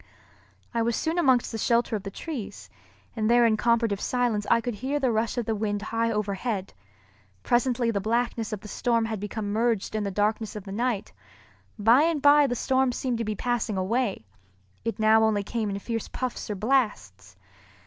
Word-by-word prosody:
I 230 - +1
was 230 0 +1
soon 325 +7 -1
amongst 260 -7 +3
the 225 - -4
shelter 235 0 +1
of 210 - -3
the 195 - -6
trees, 255 0 -7 0.4
and 220 -1 0
there 240 0 +5
in 225 -2 +4
comparative 230 -3 +1
silence 240 -5 0
I - - +5
could 240 +1 -3
hear 265 +7 -2
the 260 -3 +1
rush 225 +2 -1
of 240 - -1
the 225 - 0
wind 205 -1 -2
high 230 +1 0
overhead. 205 -1 -2 0.7
Presently 240 -1 +1
the 200 -3 -1
blackness 230 +1 -1
of 210 -2 -4
the 215 - -10
storm 230 +1 0
had 220 -2 -3
become 205 0 -4
merged 225 -2 0
in 215 -1 -1
the 200 - -2
darkness 210 +3 -1
of 210 - -6
the 195 - -9
night. 230 0 -2 0.6
By 225 +6 +5
and 325 -1 +2
by 290 0 +6
the 245 - -2
storm 260 +1 +1
seemed 245 -1 -2
to - - 0
be 215 -1 -3
passing 240 -3 -1
away, 200 - -1 0.6
it 230 0 -3
now 220 0 +5
only 215 -2 +2
came 220 0 -2
in 200 - -3
fierce 225 +2 -4
puffs 255 -3 -4
or 210 - -2
blasts. 200 - -1
225 Hz, 195 wpm, -26 LUFS, 210-245 Hz, 0.7 s, by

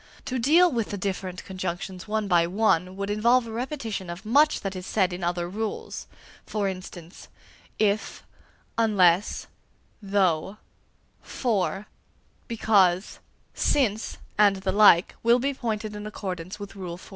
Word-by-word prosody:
To 255 0 -2
deal 330 +8 +5
with 230 -5 -1
the 205 - -4
different 185 -2 -4
conjunctions 185 0 -5
one 215 -1 -1
by 170 -3 +3
one, 185 -2 +1
would 200 +1 -3
involve 235 +4 +3
a 225 - -8
repetition 230 - -4
of 175 +5 -7
much 290 +7 +4
that 195 -1 -4
is 185 0 -7
said 190 -4 +1
in 180 0 -6
other 175 0 -1
rules. 215 +4 -5 0.4
For 210 -2 -2
instance, 185 -2 -8 0.5
if, 215 0 0 0.6
unless, 195 -4 +3 0.6
though, 195 -2 0 0.6
for, 210 -4 -1 0.6
because, 200 -5 +2 0.3
since, 225 -6 0 0.2
and 205 -2 +6
the 190 0 -2
like, 195 -3 +6
will 235 +1 +5
be 275 +3 -1
pointed 215 -4 -3
in 210 0 -6
accordance 185 -3 -6
with 205 -1 -8
Rule 180 -3 -6
IX. 180 - -14
200 Hz, 140 wpm, -26 LUFS, 185-220 Hz, 0.6 s, and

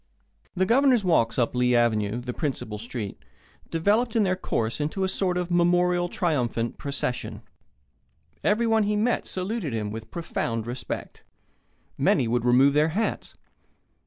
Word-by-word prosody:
The 190 +1 +2
Governor's 250 +1 +4
walks 140 -11 +2
up 120 -2 +1
Lee 125 0 +2
Avenue, 115 -1 +1
the 125 0 -5
principal 125 -9 -3
street, 105 - -6 0.5
developed 210 +8 +1
in 225 - +4
their 185 -2 +1
course 115 -8 -2
into 155 +6 -1
a - - +2
sort 185 -1 0
of 180 0 -2
memorial, 175 0 +2
triumphant 125 -10 -1
procession. 140 -3 -3 1.0
Everyone 225 +1 +3
he 210 0 +1
met 225 +3 0
saluted 185 - -3
him 105 -2 -2
with 110 +1 -7
profound 115 -9 -3
respect. 120 +2 -6 0.8
Many 120 - +3
would 120 +1 0
remove 130 +3 +5
their 150 +2 +3
hats. 225 - -2
155 Hz, 140 wpm, -25 LUFS, 120-190 Hz, 1.0 s, remove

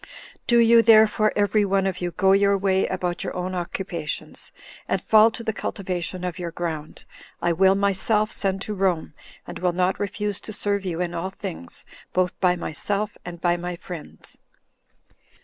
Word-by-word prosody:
Do 240 - +4
you, 230 0 +7
therefore, 215 -1 +5
every 205 +1 +3
one 195 -1 +1
of 185 -1 -2
you, 175 - -1
go 190 +3 +2
your 200 0 +4
way 190 -1 +1
about 180 0 -2
your 185 - -4
own 180 +1 -3
occupations, 175 -2 -4 0.4
and - - +1
fall 220 +1 +6
to 230 +1 -7
the 220 - -1
cultivation 185 -3 -4
of 180 0 -4
your 175 -1 -3
ground; 160 -3 -5 0.3
I 170 - +1
will 190 +3 +4
myself 200 +2 +1
send 195 0 -1
to 210 - -4
Rome, 185 -6 0 0.3
and - - -8
will 180 -1 +1
not 180 +1 +1
refuse 205 0 -2
to - - -7
serve 200 -1 -1
you 175 -1 -2
in 175 -1 -2
all 170 +2 -3
things, 85 - -8 0.3
both 180 0 +1
by 180 -2 +3
myself 200 +5 -2
and 175 -1 -8
by 175 0 +2
my 175 0 -4
friends." 170 -2 -8
190 Hz, 175 wpm, -24 LUFS, 175-205 Hz, 0.4 s, you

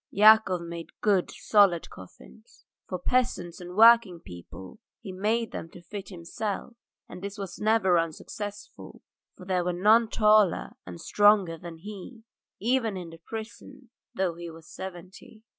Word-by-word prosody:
Yakov 210 -3 +5
made 170 -1 -9
good, 195 -4 +2
solid 200 -6 +3
coffins. 65 -8 -16 0.2
For 185 - -4
peasants 180 -5 -1
and 180 0 -9
working 225 -5 +6
people 90 - -12 0.2
he 200 - -8
made 220 +5 -1
them 165 - -7
to 175 - -14
fit 200 +3 -8
himself, 195 +5 -5 0.3
and 180 - -10
this 200 +1 -6
was 195 -3 -7
never 210 -5 +3
unsuccessful, 205 - -7 0.3
for 180 - -12
there 180 -1 0
were 180 0 -1
none 215 +5 +4
taller 215 -4 +3 0.2
and 90 -1 -9
stronger 205 -5 +3
than 165 0 -10
he, 210 +5 -10 0.4
even 230 -3 0
in 175 -2 -8
the 165 - -13
prison, 225 +5 -10 0.2
though 185 -2 0
he 170 0 -8
was 165 0 -13
seventy. 190 +4 -10
190 Hz, 145 wpm, -27 LUFS, 170-215 Hz, 0.4 s, working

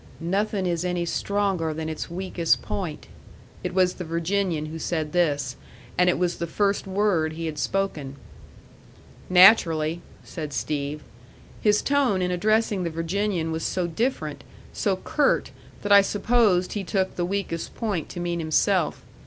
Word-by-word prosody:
"Nothing 195 +3 -1
is 175 -1 0
any 180 -1 -1
stronger 190 -4 -1
than 160 0 -4
its 160 -1 -4
weakest 175 -1 0
point." 175 -6 -4 0.6
It 180 - -2
was 185 -1 +3
the 180 - -6
Virginian 170 0 -1
who 160 +1 -6
said 155 -2 -2
this, 145 -7 +1 0.4
and 180 0 +4
it - - +2
was 180 -1 0
the 170 - -3
first 200 +3 0
word 190 -5 +1
he 165 +1 -5
had 155 -2 -4
spoken. 155 -9 -2 1.1
"Naturally," 175 -4 +5 0.2
said 150 -3 -6
Steve. 140 +5 -3 0.6
His 210 -1 +3
tone 275 -9 +2
in 180 - 0
addressing 215 +2 +1
the 170 - -1
Virginian 165 +1 -1
was 160 0 -2
so 180 -2 -1
different, 230 +11 -2 0.3
so - - 0
curt, - - +1 0.3
that 205 - -2
I 200 0 +9
supposed 205 -3 +2
he 205 - -3
took 190 0 -1
the 175 - -1
weakest 180 -3 -3
point 205 -8 -2
to - - -7
mean 175 0 -2
himself. 155 -1 +1
175 Hz, 155 wpm, -25 LUFS, 160-200 Hz, 1.1 s, I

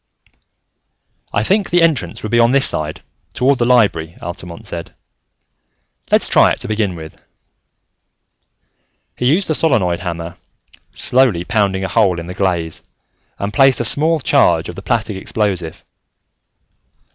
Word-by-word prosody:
"I 105 - 0
think 200 - 0
the 175 -1 +3
entrance 130 - 0
would 110 - -5
be 120 - +3
on 120 +2 +4
this 140 0 +5
side, 75 0 -2 0.3
toward 135 +1 +2
the 120 - +2
Library," 100 -10 +1
Altamont 85 0 -9
said. 85 -1 -7 1.2
"Let's - - +3
try - - +5
it, - - -2
to - - -6
begin 105 -4 -1
with." 80 -1 -11 1.9
He 125 - -1
used 175 +9 +2
the 155 - 0
solenoid 105 - +1
hammer, 85 -1 -6 0.5
slowly 120 -9 +1
pounding 95 -1 0
a - - -1
hole 95 -6 +1
in 85 - -7
the 90 - -7
glaze, 85 -4 -2 0.6
and 100 +1 -4
placed 135 +2 +4
a 120 - -1
small 155 +7 +4
charge 85 - +2
of - - -6
the 95 - -9
plastic 110 -1 -2
explosive. 95 -5 -3
100 Hz, 145 wpm, -17 LUFS, 85-125 Hz, 1.9 s, this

